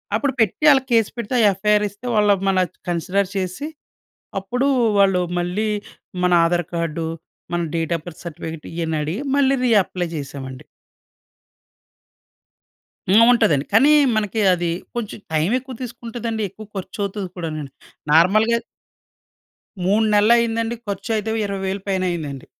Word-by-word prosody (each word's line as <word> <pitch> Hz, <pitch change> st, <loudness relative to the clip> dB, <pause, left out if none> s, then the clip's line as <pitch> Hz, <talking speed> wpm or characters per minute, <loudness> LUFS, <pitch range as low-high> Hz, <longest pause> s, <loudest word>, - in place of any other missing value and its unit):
అప్పుడు 280 Hz, -2 st, 0 dB
పెట్టి 225 Hz, +7 st, +1 dB
ఆళ్ళకి 270 Hz, -2 st, +3 dB
కేస్ 225 Hz, -3 st, +3 dB
పెడితే 235 Hz, +1 st, -4 dB
ఆ -, -, +4 dB
యఫ్ఐఆర్ 210 Hz, +1 st, +3 dB
ఇస్తే 205 Hz, +5 st, -15 dB
వాళ్ళు 210 Hz, -1 st, +4 dB
మన 190 Hz, -1 st, +3 dB, 0.3 s
కన్సిడర్ 185 Hz, +3 st, 0 dB
చేసి, 190 Hz, +9 st, -3 dB, 0.7 s
అప్పుడు 245 Hz, +8 st, -1 dB, 0.3 s
వాళ్ళు 195 Hz, -2 st, +4 dB, 0.2 s
మళ్ళీ 180 Hz, +5 st, -1 dB, 0.6 s
మన 180 Hz, -, +3 dB
ఆధార్ 175 Hz, 0 st, +1 dB
కార్డు, 165 Hz, -1 st, -2 dB, 0.5 s
మన 175 Hz, -, +1 dB
డేట్ 165 Hz, 0 st, -1 dB
ఆఫ్ 155 Hz, -, -15 dB
బర్త్ 175 Hz, 0 st, -10 dB
సర్టిఫికేట్ 160 Hz, -1 st, -7 dB
ఇయన్ని 165 Hz, -2 st, -2 dB
అడిగి 165 Hz, -, -3 dB
మళ్ళీ 275 Hz, -1 st, +3 dB
రీఅప్లై 190 Hz, -6 st, +2 dB
చేశామండి. 135 Hz, -2 st, -7 dB, 2.5 s
హ్మ్. 215 Hz, +4 st, +7 dB
ఉంటదండి. 190 Hz, -, +3 dB
కానీ 270 Hz, +8 st, +6 dB, 0.2 s
మనకి 220 Hz, 0 st, -1 dB
అది 175 Hz, -1 st, -1 dB, 0.3 s
కొంచెం 220 Hz, -3 st, -4 dB
టైం 155 Hz, +3 st, +2 dB
ఎక్కువ 260 Hz, 0 st, -10 dB
తీసుకుంటదండి. 230 Hz, -2 st, -4 dB
ఎక్కువ 215 Hz, +4 st, -12 dB
ఖర్చు 190 Hz, +1 st, -7 dB
అవుతది 200 Hz, -1 st, -3 dB
కూడానండి. 155 Hz, -5 st, -5 dB, 0.4 s
నార్మల్‌గా 215 Hz, +9 st, +4 dB, 1.3 s
3 205 Hz, +4 st, +3 dB
నెలలు 210 Hz, +3 st, +5 dB
అయిందండి. 230 Hz, 0 st, 0 dB
ఖర్చు 200 Hz, +2 st, -4 dB
అయితే 215 Hz, +1 st, -3 dB
ఓ -, -, -1 dB
20,000 195 Hz, 0 st, -3 dB
పైన 190 Hz, -1 st, 0 dB
అయ్యిందండి. 145 Hz, -6 st, -5 dB
195 Hz, 135 wpm, -21 LUFS, 170-225 Hz, 2.5 s, హ్మ్